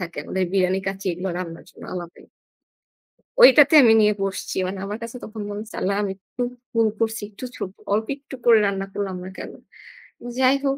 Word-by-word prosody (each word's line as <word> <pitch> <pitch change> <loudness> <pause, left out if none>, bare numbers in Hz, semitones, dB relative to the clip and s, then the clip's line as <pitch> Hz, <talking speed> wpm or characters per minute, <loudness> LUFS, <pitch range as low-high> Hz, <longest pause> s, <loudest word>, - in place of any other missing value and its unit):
থাকে 175 -1 -6
আমাদের 190 0 -1
বিরানি, 190 -1 +2
কাচ্চি 195 0 -4
এগুলো 180 +3 -4
রান্নার 165 -2 -7
জন্য - - -16
আলাদাই। 175 -1 -8 1.1
ওইটাতে 300 - +8
আমি 225 -2 +7
নিয়ে 210 0 +4
বসছি। 195 -1 -3
মানে 190 +1 -5
আমার 205 +2 -4
কাছে 230 +2 -7
তখন 215 0 -7
মনে 205 - -5
হচ্ছে 220 0 -10
আল্লাহ্ 195 +1 0
আমি 195 - -2
একটু 200 +5 -9 0.3
ভুল 230 -1 +3
করছি। 225 0 -1
একটু 215 +4 -9
ছো - - -13 0.3
অল্প 220 +2 0
একটু 275 -1 -11
করে 230 -2 +7
রান্না 195 -1 -1
করলাম 195 -2 -3
না 185 - -7
কেনো? - - -8 0.8
যাই 260 +1 +4
হোক 275 0 +1
205 Hz, 190 wpm, -23 LUFS, 190-230 Hz, 1.1 s, ওইটাতে